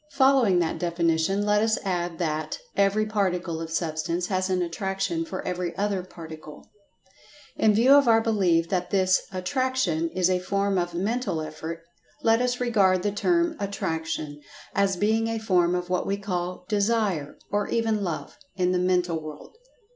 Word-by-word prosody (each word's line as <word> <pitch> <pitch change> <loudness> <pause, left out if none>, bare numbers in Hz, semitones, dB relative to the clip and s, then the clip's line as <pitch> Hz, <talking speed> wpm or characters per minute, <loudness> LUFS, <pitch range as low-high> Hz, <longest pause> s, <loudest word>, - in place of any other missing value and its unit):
Following 265 -8 +4
that 170 -2 0
definition, 170 +3 +1
let 210 0 +3
us 220 0 +2
add 175 -3 -2
that: 155 -3 -2 0.2
Every 200 +2 +2
particle 185 -6 -1
of 165 - -5
Substance 165 +1 -2
has 185 -1 0
an 185 -1 +1
attraction 195 - -2
for 325 - -5
every 180 -1 -3
other 200 -2 0
particle. 160 -4 -11 0.8
In 215 -1 +3
view 240 +5 +4
of 285 -2 +6
our 225 -1 +6
belief 190 -7 +2
that 180 -2 -1
this 185 -1 +3
"attraction" 185 -3 0
is 180 +1 +1
a 185 -1 +1
form 195 +1 0
of 175 -1 -3
mental 200 -1 -1
effort, 160 +2 -6 0.4
let 225 +1 +4
us 250 0 0
regard 195 -7 +2
the 205 - +1
term 340 - +1
"Attraction" 160 -6 -3 0.3
as 195 -2 +1
being 220 +3 +1
a 225 0 -2
form 180 -5 +2
of 180 0 -3
what 180 - 0
we 200 - 0
call 180 -2 -4
"Desire," 205 -7 0
or 205 0 0
even 225 -3 0
"Love," 170 -4 -5 0.2
in 180 -1 +1
the 180 - +1
mental 180 -2 +1
world. 155 - -10
185 Hz, 160 wpm, -25 LUFS, 170-210 Hz, 0.8 s, of